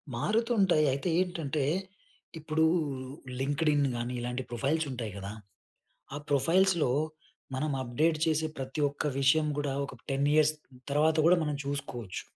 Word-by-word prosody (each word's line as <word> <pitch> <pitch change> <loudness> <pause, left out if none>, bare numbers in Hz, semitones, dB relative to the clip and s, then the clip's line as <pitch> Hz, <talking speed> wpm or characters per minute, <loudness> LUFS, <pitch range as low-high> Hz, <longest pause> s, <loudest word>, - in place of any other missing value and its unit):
మారుతుంటాయి. 205 - +2
అయితే 140 +6 -2
ఏంటంటే, 165 -6 -1 0.8
ఇప్పుడూ 160 +1 +1 0.8
లింక్డ్ఇన్ 145 +1 +2
గానీ, 120 +1 -3
ఇలాంటి 125 +2 -3
ప్రొఫైల్స్ 140 +7 0
ఉంటాయి 115 -4 -4
కదా! 100 0 -6 0.8
ఆ - - -3
ప్రొఫైల్స్‌లో 170 +1 +3 0.6
మనం 150 +3 -1
అప్డేట్ 150 +6 +1
చేసే, 160 0 +1
ప్రతి 135 +3 -4
ఒక్క 145 - -5 0.2
విషయం 150 +3 +4
కూడా 145 -2 -1
ఒక 140 - -8 0.2
10 135 +1 +1
ఇయర్స్ 155 0 +5 0.4
తర్వాత 155 +3 +3
కూడా 180 +2 +6
మనం 150 -1 -1
చూసుకోవచ్చు. 135 -8 -4
145 Hz, 125 wpm, -30 LUFS, 135-160 Hz, 0.8 s, కూడా